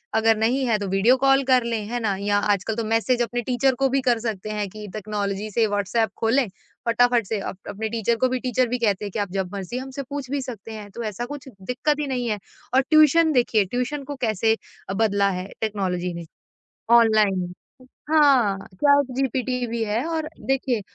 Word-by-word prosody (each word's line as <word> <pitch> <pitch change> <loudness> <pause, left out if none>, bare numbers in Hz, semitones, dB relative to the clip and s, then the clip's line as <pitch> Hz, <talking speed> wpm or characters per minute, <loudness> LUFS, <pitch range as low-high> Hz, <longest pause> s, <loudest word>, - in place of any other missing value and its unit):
अगर 225 0 +4
नहीं 250 +5 +1
है 225 -3 +2
तो 200 - -3
वीडियो 195 +7 +4
कॉल 270 +1 +4
कर 255 -2 +3
लें, 230 -3 -2
है 240 +1 -2
ना? 205 -4 0
या 205 0 +1
आजकल 205 +1 0
तो 230 - -2
मैसेज 225 +3 +1
अपने 240 +1 -1
टीचर 255 +2 +1
को 270 -1 +3
भी 270 +1 +1
कर 245 -3 +2
सकते 215 -3 -4
हैं 210 -1 -2
कि 210 +1 -9
टेक्नोलॉज़ी 205 0 -3
से, 225 +2 +2
व्हाट्सएप 205 +2 0
खोलें 235 +3 +2 0.4
फ़टाफ़ट 240 0 +3
से 220 - -1
अप 195 - -5
अपने 215 +2 -4
टीचर 230 +1 0
को - - +6
भी 255 - -1
टीचर 255 0 +1
भी 250 +2 -1
कहते 210 -3 +1
हैं 200 - -5
कि 210 - -3
आप 200 -3 -2
जब 190 -2 -2
मर्ज़ी 200 +5 -5
हमसे 265 +1 -5
पूछ 280 -3 -5
भी 285 -1 -1
सकते 225 -4 -8
हैं। 210 -1 -8
तो 235 - -6
ऐसा 225 +5 -5
कुछ 285 +1 -8
दिक़्कत 275 +8 -1
ही 290 - -1
नहीं 250 -2 -2
है 210 - -1 0.3
और 265 - +5
ट्यूशन 310 +2 +5
देखिए 230 -5 +3
ट्यूशन 250 +7 -3
को 285 +1 -6
कैसे 220 0 +2 0.4
बदला 200 -2 +2
है 185 - -7
टेक्नोलॉज़ी 185 -5 -2
ने। 170 0 -7 0.7
ऑनलाइन 205 -5 +2 0.6
हाँ, 270 -10 +4 0.2
चैट 285 +4 +3
जीपीटी 255 -1 -1
भी 230 0 -2
है 215 +4 -1
और 320 -2 -2 0.2
देखिए 265 -4 0
230 Hz, 205 wpm, -23 LUFS, 205-260 Hz, 0.7 s, को